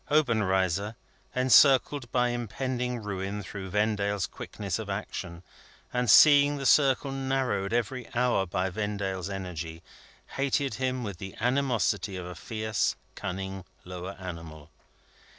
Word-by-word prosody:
Obenreizer, 105 Hz, -, +2 dB, 0.4 s
encircled 130 Hz, 0 st, +5 dB
by 125 Hz, -1 st, +2 dB
impending 125 Hz, +1 st, -3 dB
ruin 100 Hz, 0 st, -4 dB
through 95 Hz, +1 st, -7 dB
Vendale's 105 Hz, -1 st, 0 dB
quickness 100 Hz, +2 st, -5 dB
of 110 Hz, -2 st, -6 dB
action, 90 Hz, -3 st, -5 dB, 0.5 s
and 125 Hz, -1 st, 0 dB
seeing 145 Hz, +4 st, +7 dB
the 135 Hz, -, -5 dB
circle 135 Hz, -1 st, +4 dB
narrowed 135 Hz, -7 st, -1 dB
every 120 Hz, +1 st, -2 dB
hour 120 Hz, -6 st, +2 dB
by 90 Hz, +2 st, -1 dB
Vendale's 100 Hz, -2 st, -3 dB
energy, 85 Hz, -4 st, -6 dB, 0.5 s
hated 140 Hz, 0 st, +1 dB
him 130 Hz, -1 st, -2 dB
with 100 Hz, -5 st, -5 dB
the 95 Hz, 0 st, -7 dB
animosity 125 Hz, -5 st, +1 dB
of 90 Hz, -, -6 dB
a 90 Hz, -, -6 dB
fierce 110 Hz, +2 st, -1 dB, 0.2 s
cunning 95 Hz, +1 st, -5 dB, 0.2 s
lower 90 Hz, +1 st, -6 dB
animal. 80 Hz, -5 st, -8 dB
105 Hz, 120 wpm, -28 LUFS, 95-125 Hz, 0.5 s, seeing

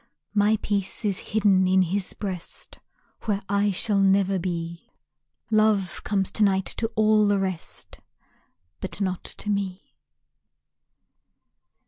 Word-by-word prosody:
My 210 Hz, +1 st, +3 dB
peace 200 Hz, +1 st, -2 dB
is 200 Hz, -3 st, 0 dB
hidden 200 Hz, -3 st, +2 dB
in 185 Hz, 0 st, +4 dB
his 185 Hz, +2 st, -2 dB
breast 185 Hz, -4 st, -5 dB, 0.5 s
Where 205 Hz, -2 st, -1 dB
I 200 Hz, +1 st, +2 dB
shall 200 Hz, +1 st, +2 dB
never 195 Hz, 0 st, +3 dB
be, 170 Hz, -1 st, -4 dB, 0.6 s
Love 215 Hz, -4 st, +2 dB
comes 195 Hz, -3 st, 0 dB
to 215 Hz, -, +3 dB
night 195 Hz, -2 st, +2 dB
to 225 Hz, -, 0 dB
all 215 Hz, -1 st, +4 dB
the 205 Hz, 0 st, +3 dB
rest, 190 Hz, -3 st, -4 dB, 0.8 s
But -, -, -4 dB
not 185 Hz, -3 st, -2 dB
to 210 Hz, -, -4 dB
me. 195 Hz, -2 st, -3 dB
195 Hz, 120 wpm, -25 LUFS, 185-210 Hz, 0.8 s, in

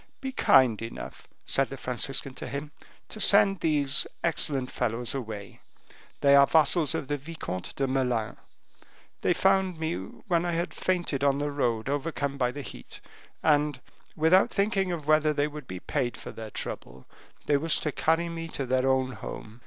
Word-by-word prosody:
"Be 265 Hz, -1 st, -4 dB
kind 130 Hz, -, +4 dB
enough," 115 Hz, 0 st, -8 dB, 0.2 s
said 135 Hz, -1 st, +1 dB
the 135 Hz, -, -7 dB
Franciscan 130 Hz, +2 st, -2 dB
to -, -, -7 dB
him, 140 Hz, +3 st, -5 dB, 0.4 s
"to 215 Hz, -, -7 dB
send 195 Hz, -1 st, +5 dB
these 145 Hz, -4 st, +2 dB, 0.2 s
excellent 140 Hz, -6 st, +1 dB
fellows 120 Hz, -1 st, -2 dB
away; 110 Hz, -7 st, -7 dB, 0.6 s
they 140 Hz, 0 st, +5 dB
are 140 Hz, 0 st, +7 dB
vassals 160 Hz, 0 st, +3 dB
of 135 Hz, -, -3 dB
the 145 Hz, -, -1 dB
Vicomte 140 Hz, -, -6 dB
de 135 Hz, -, 0 dB
Melun. 125 Hz, -4 st, -1 dB, 0.8 s
They 175 Hz, -, +2 dB
found 190 Hz, -2 st, +2 dB
me 160 Hz, +1 st, -1 dB
when 190 Hz, -6 st, -2 dB
I 175 Hz, -1 st, -1 dB
had 170 Hz, +1 st, -2 dB
fainted 175 Hz, -7 st, -1 dB
on 140 Hz, -1 st, +3 dB
the 145 Hz, 0 st, -2 dB
road 120 Hz, -6 st, -1 dB
overcome 140 Hz, -1 st, -2 dB
by 125 Hz, -1 st, +2 dB
the 145 Hz, +2 st, -7 dB
heat, -, -, -9 dB, 0.4 s
and 150 Hz, -3 st, +2 dB, 0.4 s
without 160 Hz, +5 st, +4 dB
thinking 195 Hz, -2 st, 0 dB
of 155 Hz, -4 st, -5 dB
whether 155 Hz, 0 st, +4 dB
they 145 Hz, 0 st, +1 dB
would 150 Hz, -2 st, -9 dB
be 90 Hz, 0 st, -6 dB
paid 125 Hz, +3 st, -2 dB
for -, -, -8 dB
their 110 Hz, -1 st, -8 dB
trouble, 65 Hz, -9 st, -6 dB, 0.4 s
they 145 Hz, -, +3 dB
wished 160 Hz, +3 st, +1 dB
to 150 Hz, -, 0 dB
carry 165 Hz, +4 st, +1 dB
me 165 Hz, 0 st, -5 dB
to 140 Hz, -4 st, -4 dB
their 130 Hz, +1 st, +1 dB
own 130 Hz, -1 st, +1 dB
home. 110 Hz, -2 st, -8 dB
145 Hz, 175 wpm, -27 LUFS, 130-165 Hz, 0.8 s, are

